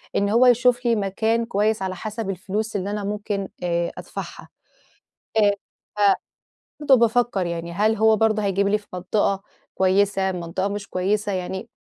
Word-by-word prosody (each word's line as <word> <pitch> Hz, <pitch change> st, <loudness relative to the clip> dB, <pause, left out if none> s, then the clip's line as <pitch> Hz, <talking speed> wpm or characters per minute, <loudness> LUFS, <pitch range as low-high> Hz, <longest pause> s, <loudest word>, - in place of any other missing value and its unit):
إن 200 Hz, 0 st, +2 dB
هو 235 Hz, +4 st, +5 dB
يشوف 245 Hz, 0 st, +4 dB
لي 235 Hz, -1 st, +3 dB
مكان 220 Hz, +3 st, 0 dB
كويِس 215 Hz, -1 st, 0 dB
على 185 Hz, -1 st, -2 dB
حسب 215 Hz, +2 st, -5 dB
الفلوس 205 Hz, +4 st, -3 dB
اللي 200 Hz, 0 st, -2 dB
أنا 210 Hz, -1 st, -3 dB
ممكن 205 Hz, -1 st, -3 dB, 0.2 s
آآ، 170 Hz, -1 st, 0 dB
أدفَعها. -, -, -8 dB, 0.9 s
آآ، 205 Hz, -2 st, +5 dB, 0.4 s
ف -, -, -4 dB, 0.8 s
فبرضه 285 Hz, -3 st, +5 dB
بافكر 235 Hz, -4 st, +2 dB
يعني، 170 Hz, 0 st, -4 dB
هل 215 Hz, +5 st, +2 dB
هو 220 Hz, +1 st, +4 dB
برضه 215 Hz, -1 st, +2 dB
هيجيب 200 Hz, 0 st, +1 dB
لي 210 Hz, +1 st, +3 dB
في 205 Hz, -, -18 dB
منطقة 195 Hz, +2 st, 0 dB, 0.3 s
كويِسة، 190 Hz, 0 st, +2 dB
منطقة 180 Hz, +2 st, -3 dB
مش 205 Hz, 0 st, -5 dB
كويِسة 200 Hz, +3 st, 0 dB
يعني، 190 Hz, +3 st, -4 dB
205 Hz, 155 wpm, -23 LUFS, 190-220 Hz, 0.9 s, هو